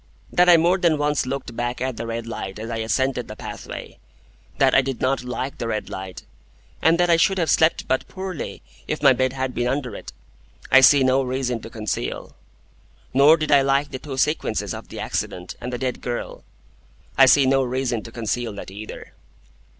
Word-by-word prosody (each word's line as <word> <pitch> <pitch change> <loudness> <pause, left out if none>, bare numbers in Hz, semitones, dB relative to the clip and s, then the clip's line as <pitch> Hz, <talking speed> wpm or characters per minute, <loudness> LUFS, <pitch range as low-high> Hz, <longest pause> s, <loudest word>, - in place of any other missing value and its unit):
That 180 0 +5
I 175 - +8
more 175 +4 +3
than 170 -4 +3
once 145 -2 0
looked 130 -3 -5
back 120 +1 -3
at 130 0 -2
the 115 - -5
red 115 0 -4
light 95 -4 -6
as 110 +2 -6
I 115 - -2
ascended 125 +2 -1
the 105 - -8
pathway, - - -8 0.6
that 135 -2 +4
I 130 - +6
did 135 -2 -4
not 130 0 0
like 130 +2 -5
the 115 - -3
red 110 -2 -3
light, 95 -1 -7 0.6
and 165 +1 +4
that 175 -1 +3
I 165 - +5
should 190 +3 +3
have 165 -3 +1
slept 160 +1 +2
but 130 - 0
poorly 185 -4 -6 0.2
if - - -3
my - - +7
bed 130 0 0
had 130 -1 -3
been 120 0 -1
under 130 -2 -2
it, - - -9 0.6
I 135 - +8
see 135 +1 +7
no 130 +1 +3
reason 130 -2 -2
to 115 - -9
conceal. 105 -4 -4 0.8
Nor 145 +5 +6
did 155 -1 -2
I 140 -1 +7
like 140 +1 +1
the 130 - -5
two 135 -2 -7
sequences 150 +4 0
of - - -8
the - - -9
accident 90 0 -4
and 125 +1 -5
the 125 - -3
dead 125 0 -3
girl. 120 -1 -5 0.7
I 135 - +7
see 140 +1 +6
no 135 +1 +3
reason 130 -2 -1
to 115 - -11
conceal 115 0 -3
that 100 - -8
either. 105 +2 -9
130 Hz, 205 wpm, -22 LUFS, 120-140 Hz, 0.8 s, I